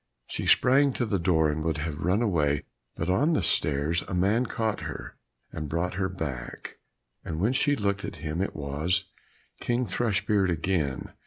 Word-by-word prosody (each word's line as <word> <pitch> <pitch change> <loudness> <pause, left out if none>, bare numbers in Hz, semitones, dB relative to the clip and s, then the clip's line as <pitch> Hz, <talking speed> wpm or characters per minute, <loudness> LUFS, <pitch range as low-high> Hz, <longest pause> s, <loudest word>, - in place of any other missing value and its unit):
She - - -4
sprang 135 +2 +5
to 125 - -1
the 100 -3 0
door 80 -3 +3
and 75 +1 -3
would 80 -1 0
have 75 -1 -4
run 95 +7 +2
away, 75 -9 +1 0.3
but 80 - -3
on 135 - +3
the - - +1
stairs 75 +2 +1
a - - -3
man 105 +7 +2
caught 110 -1 -1
her - - -7 0.4
and 75 -1 -5
brought 85 +4 -1
her 95 0 -1
back; 70 -10 -6 0.4
and 80 -1 -4
when 110 +8 +2
she 145 +2 +3
looked 100 -4 -1
at - - -5
him 80 +2 -3
it 100 - -2
was 75 +6 0 0.5
King 120 +1 0
Thrushbeard 105 -4 +1
again. 80 -5 -1
90 Hz, 175 wpm, -27 LUFS, 80-105 Hz, 0.5 s, sprang